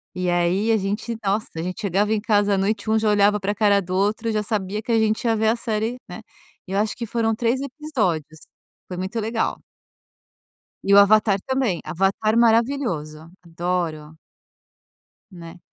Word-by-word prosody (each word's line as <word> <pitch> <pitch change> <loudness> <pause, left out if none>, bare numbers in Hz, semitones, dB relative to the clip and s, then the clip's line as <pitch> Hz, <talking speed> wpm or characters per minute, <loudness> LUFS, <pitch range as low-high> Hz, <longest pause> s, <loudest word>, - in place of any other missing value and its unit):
e 180 0 -2
aí, 175 +5 +1
a 225 - +4
gente, 210 +4 -3
nossa, 205 +2 0
a - - -2
gente 180 +2 -5
chegava 205 +2 0
em 220 - +1
casa 205 -2 +2
à - - -1
noite, 205 +2 -1
um 220 - +3
já 215 -1 +1
olhava 205 0 +3
para 205 +1 -1
cara 205 -1 +3
do 185 0 -5
outro 210 +4 0
e - - 0
já 215 - 0
sabia 210 -1 -2
que 235 - -4
a 230 - +4
gente 220 +1 0
ia 225 -1 +2
ver 220 0 +2
a 225 - +2
série, 225 +1 -2
né, 180 - -8 0.5
e - - -9
eu 195 - +1
acho 210 0 -1
que 240 - -5
foram 225 0 0
3 240 +3 0
episódios, 220 - -3 0.5
foi 180 - -7
muito 190 +5 -3
legal. 225 +1 -2 1.2
E 200 - -2
o 200 - +8
Avatar 205 0 +4
também, 260 -10 0
Avatar 195 +5 0
maravilhoso, 225 - +1
adoro. 165 -3 -4 1.1
Né. 170 -1 -11
210 Hz, 185 wpm, -22 LUFS, 185-225 Hz, 1.2 s, o